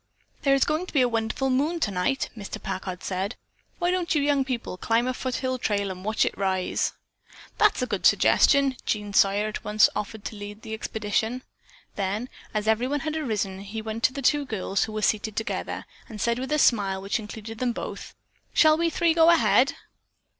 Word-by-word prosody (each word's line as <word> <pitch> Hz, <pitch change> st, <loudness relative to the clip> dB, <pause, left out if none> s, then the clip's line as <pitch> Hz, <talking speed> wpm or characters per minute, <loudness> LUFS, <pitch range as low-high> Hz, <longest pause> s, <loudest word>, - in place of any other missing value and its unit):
"There 275 Hz, -1 st, +4 dB
is 275 Hz, -, +3 dB
going 310 Hz, +5 st, -1 dB
to -, -, -10 dB
be 280 Hz, -, +4 dB
a -, -, +3 dB
wonderful 230 Hz, +3 st, -1 dB
moon 300 Hz, +7 st, +1 dB
tonight," 205 Hz, -, 0 dB
Mr. 205 Hz, -3 st, -7 dB
Packard 185 Hz, -1 st, -5 dB
said, 195 Hz, +4 st, -2 dB, 0.4 s
"Why 350 Hz, 0 st, +1 dB
don't 360 Hz, -3 st, 0 dB
you -, -, +4 dB
young 285 Hz, -1 st, +2 dB
people 250 Hz, -7 st, -4 dB
climb 230 Hz, +5 st, +1 dB
the 255 Hz, -, 0 dB
foothill 255 Hz, 0 st, -2 dB
trail 200 Hz, -4 st, 0 dB
and 185 Hz, 0 st, -8 dB
watch 215 Hz, +2 st, +1 dB
it -, -, -2 dB
rise?" 190 Hz, -2 st, 0 dB, 0.7 s
"That's -, -, +4 dB
a -, -, +2 dB
good -, -, +2 dB
suggestion!" 275 Hz, -3 st, +4 dB
Jean 205 Hz, -2 st, -2 dB
Sawyer 200 Hz, 0 st, +4 dB
at 215 Hz, -, -5 dB
once 210 Hz, +1 st, +4 dB
offered 210 Hz, +1 st, -5 dB
to -, -, -5 dB
lead 205 Hz, +1 st, -9 dB
the 220 Hz, -, -6 dB
expedition. 220 Hz, +3 st, -2 dB, 0.5 s
Then, 205 Hz, +5 st, -2 dB, 0.2 s
as 215 Hz, 0 st, -2 dB
everyone 250 Hz, +6 st, +1 dB
had 310 Hz, -1 st, -3 dB
arisen, 210 Hz, -10 st, -2 dB
he 205 Hz, +3 st, -6 dB
went 220 Hz, +1 st, -5 dB
to 255 Hz, -, +2 dB
the 275 Hz, 0 st, -5 dB
two 290 Hz, +3 st, +3 dB
girls, 200 Hz, -6 st, -1 dB
who 220 Hz, -, -8 dB
were 215 Hz, 0 st, -3 dB
seated 215 Hz, +1 st, 0 dB
together, 220 Hz, -, -3 dB, 0.2 s
and 215 Hz, -2 st, -8 dB
said 235 Hz, +3 st, +1 dB
with 265 Hz, +3 st, -4 dB
a 300 Hz, -, +3 dB
smile 200 Hz, -8 st, +3 dB
which 195 Hz, +4 st, -2 dB
included 220 Hz, +1 st, -8 dB
them 250 Hz, -1 st, +1 dB
both, -, -, -7 dB, 0.4 s
"Shall 310 Hz, 0 st, +5 dB
we 335 Hz, 0 st, +2 dB
three 335 Hz, 0 st, +2 dB
go 325 Hz, 0 st, +6 dB
ahead?" 335 Hz, -, +4 dB
225 Hz, 195 wpm, -26 LUFS, 205-270 Hz, 0.7 s, go